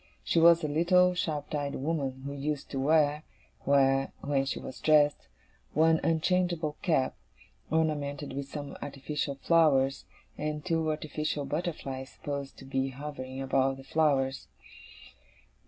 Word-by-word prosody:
She 170 - +2
was 170 0 +6
a - - +1
little, 180 +4 +4
sharp 155 -5 -3
eyed 145 -1 -2
woman, 135 -3 -2
who 140 - -4
used 140 0 -3
to 135 - -2
wear, 150 +1 +3 0.4
when 135 -1 +3 0.3
she 135 - -2
was - - -8
dressed, 150 -2 +3 0.5
one 160 +1 +4
unchangeable 165 -1 +1
cap, 155 -9 +1 0.5
ornamented 145 -3 -1
with 140 0 -4
some 145 -1 -6
artificial 140 0 -3
flowers, 135 -3 +3 0.3
and 150 0 -3
two 165 -3 0
artificial 155 -1 -2
butterflies 140 -4 -4
supposed 140 -1 -6
to 135 - -12
be 135 0 -1
hovering 135 -1 -6
above 135 0 +1
the 135 - -11
flowers. 135 -2 +1
145 Hz, 130 wpm, -29 LUFS, 135-160 Hz, 0.5 s, was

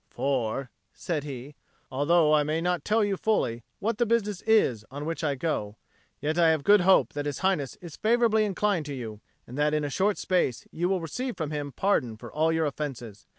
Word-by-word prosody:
"For," 130 -1 -2 0.2
said 155 -5 -3
he, 135 0 -7 0.4
"although 155 +3 +3
I 150 - +5
may 155 +2 0
not 175 -2 -1
tell 215 +1 +2
you 205 -1 0
fully 150 - 0 0.2
what 215 +1 -2
the 240 - +3
business 210 -4 0
is 130 - +3
on 145 +3 -6
which 165 +1 -3
I 145 -3 +1
go, 120 -8 -2 0.4
yet 155 +4 -1
I 165 -1 +6
have 160 -3 +1
good 205 +2 +6
hope 190 +1 +4
that 145 0 -3
His 145 - -3
Highness 155 -9 0
is 170 -4 -10
favourably 225 -1 +3
inclined 200 -5 0
to 145 - -4
you, 110 -4 -7 0.2
and 130 +4 -8
that 150 +1 +2
in 150 - 0
a 145 - -3
short 200 +6 +1
space 180 -10 0
you 175 +2 -1
will 190 -2 0
receive 250 - -4
from 155 -3 -3
him 145 -2 -3
pardon 130 - 0
for - - -11
all 160 +2 +2
your 160 0 +1
offences. 130 -8 -5
155 Hz, 210 wpm, -27 LUFS, 140-190 Hz, 0.4 s, I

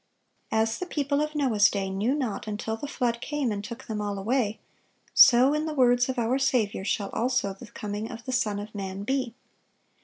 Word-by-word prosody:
As 225 0 +1
the 365 - -4
people 285 -3 0
of 305 0 -2
Noah's 225 -8 +4
day 195 -1 -2
"knew 210 +8 0
not 240 -7 -3
until 215 +1 -3
the 255 +6 -6
flood 240 -4 -1
came, 290 -5 -1
and 200 -1 -3
took 235 +5 -8
them 215 -2 -3
all 205 -1 -3
away; 220 +1 0 0.5
so," 255 +3 +7
in 305 +1 -1
the 310 - -3
words 245 -1 +4
of 260 - -2
our 240 +3 +1
Saviour, 245 -8 +1
"shall 200 0 -1
also 240 -4 0
the 205 +5 -12
coming 210 +1 -5
of 230 0 -9
the 260 - -3
Son 215 -5 0
of 205 +1 -7
man 195 -1 -5
be." 255 0 -1
235 Hz, 205 wpm, -27 LUFS, 210-265 Hz, 0.5 s, so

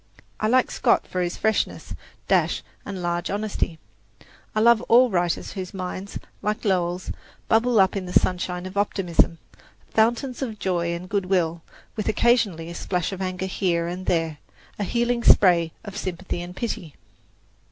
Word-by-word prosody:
I 215 - +1
like 255 +3 +3
Scott - - +2
for 180 - -3
his 175 -1 -2
freshness, 220 0 -1 0.3
dash - - +2 0.2
and 190 -3 -5
large 175 0 -1
honesty. 205 -5 -2 0.8
I - - +2
love 235 0 +5
all 245 +1 +6
writers 175 -2 0
whose 190 -1 -6
minds, 185 +1 -5 0.2
like 210 +2 -2
Lowell's, 180 -2 0 0.4
bubble 225 0 +3
up 190 +1 +4
in 190 -2 -3
the - - -5
sunshine 180 0 +1
of 185 +2 -7
optimism 180 -4 +2 0.6
fountains 240 +4 +1
of 230 -5 -3
joy 170 -3 -1
and 175 +2 -7
good 200 -1 -1
will, 170 -3 +1 0.3
with 215 -1 -2
occasionally 215 -8 +2
a - - -6
splash 180 +1 -2
of 190 -1 -5
anger 185 0 -2
and 190 - -5
here 170 -4 0
and 180 +2 -5
there 165 -3 0 0.4
a - - 0
healing 235 +3 0
spray 170 -6 +5
of 200 -2 -8
sympathy 185 -3 -4
and 175 +1 -8
pity. 185 - -4
185 Hz, 165 wpm, -24 LUFS, 175-215 Hz, 0.8 s, all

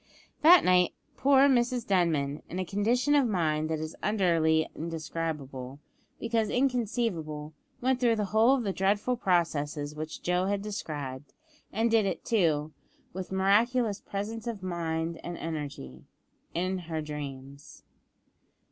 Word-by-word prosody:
That 345 +4 +8
night, 180 -1 +4 0.2
poor 275 0 +5
Mrs 245 -2 +2
Denman, 155 -7 +1
in 175 - -5
a 185 - -1
condition 235 +9 +1
of 280 -4 +4
mind 155 -6 0
that 160 - 0
is 155 +1 -5
utterly 165 -6 +2
indescribable, 155 -5 -5 0.4
because 230 -2 0
inconceivable, 220 - -1 0.3
went 255 0 +1
through 240 -2 +3
the 210 -1 -1
whole 230 +5 +5
of 255 - -2
the 195 -3 -1
dreadful 205 +6 +1
processes 150 -8 0
which 155 +1 -7
Joe 180 +1 +1
had 200 0 -1
described; 145 -10 -6 0.4
and 225 +2 +1
did 220 -3 +4
it, 185 - -4
too, 155 -8 +1 0.4
with 185 +1 -6
miraculous 210 +3 +2
presence 215 +3 -5
of 215 -5 -4
mind 165 -2 -2
and 175 -1 -5
energy 145 - -6 0.5
in 185 +2 -1
her 160 -1 -2
dreams. 140 -2 -8
180 Hz, 135 wpm, -29 LUFS, 155-225 Hz, 0.5 s, That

